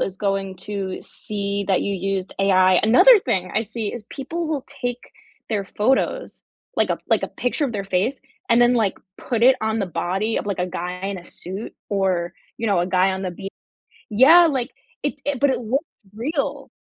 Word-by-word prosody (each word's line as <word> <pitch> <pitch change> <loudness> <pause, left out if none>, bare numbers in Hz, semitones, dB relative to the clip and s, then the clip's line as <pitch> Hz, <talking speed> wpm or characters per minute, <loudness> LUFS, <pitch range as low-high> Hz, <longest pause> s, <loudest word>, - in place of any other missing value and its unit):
is 190 0 -2
going 195 -2 -2
to 195 -2 -3
see 200 -1 -4
that 190 - +2
you 200 - -1
used 190 0 -2
AI." 185 -1 +5
Another 255 - +7
thing 185 - -1
I 220 - +2
see 220 -1 -4
is 235 -3 -7
people 325 +5 -4
will 295 -4 -2
take 245 -1 -5 0.4
their 205 -3 -1
photos, 265 - 0 0.3
like - - +2
a - - 0
like - - +3
a - - -2
picture 250 +4 -1
of 240 - -5
their 200 -2 -3
face, 195 +8 0 0.3
and 235 +1 +5
then, 240 +1 +5
like, 215 -5 +1 0.2
put 235 -2 -2
it 260 +1 +7
on 220 0 0
the 195 - -1
body 185 +6 -1
of, - - -5
like, 200 -3 -2
a 180 - 0
guy 180 0 -4
in 200 -1 -3
a 175 - -12
suit, 190 +5 -8 0.2
or, 185 -4 0 0.3
you 225 - -2
know, 195 -4 +3
a 175 - 0
guy 185 +1 +3
on 190 +1 -4
the 185 - -2
beach. 195 +2 -7 0.6
Yeah, 310 +11 +7
like 265 -4 -1 0.3
it 290 - -1
i 290 - +1
but 285 -1 +4
it 260 - -1
looks 260 +7 -1 0.3
real. 280 +3 -3
210 Hz, 205 wpm, -22 LUFS, 190-250 Hz, 0.6 s, Another